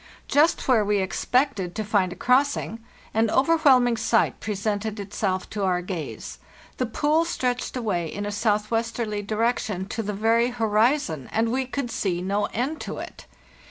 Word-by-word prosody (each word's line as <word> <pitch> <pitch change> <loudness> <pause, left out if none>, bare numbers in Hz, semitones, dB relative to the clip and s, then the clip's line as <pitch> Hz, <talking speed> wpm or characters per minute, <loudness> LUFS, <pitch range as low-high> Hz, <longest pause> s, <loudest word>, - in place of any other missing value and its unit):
Just 300 +4 +3
where 240 -5 +4
we 205 0 +1
expected 195 0 0
to 215 - -2
find 200 -3 +1
a - - -6
crossing, 255 -3 +1 0.3
an 225 0 +2
overwhelming 265 -4 +4
sight 225 0 +1
presented 210 +1 -2
itself 195 -2 -2
to 205 -2 -3
our 180 -2 +1
gaze; 175 -4 -6 0.4
the 255 - 0
pool 300 +8 +2
stretched 250 -6 -2
away 190 -8 -1
in 205 +1 -4
a 205 - -3
southwesterly 215 +1 -1
direction 215 -2 -1
to 225 - -3
the 210 -1 -3
very 225 +3 +2
horizon, 225 - +1
and 225 +1 +1
we 260 +1 -1
could 260 -2 -3
see 180 -6 -1
no 200 +3 0
end 265 +10 -3
to - - -5
it! - - -9
220 Hz, 160 wpm, -25 LUFS, 205-245 Hz, 0.4 s, where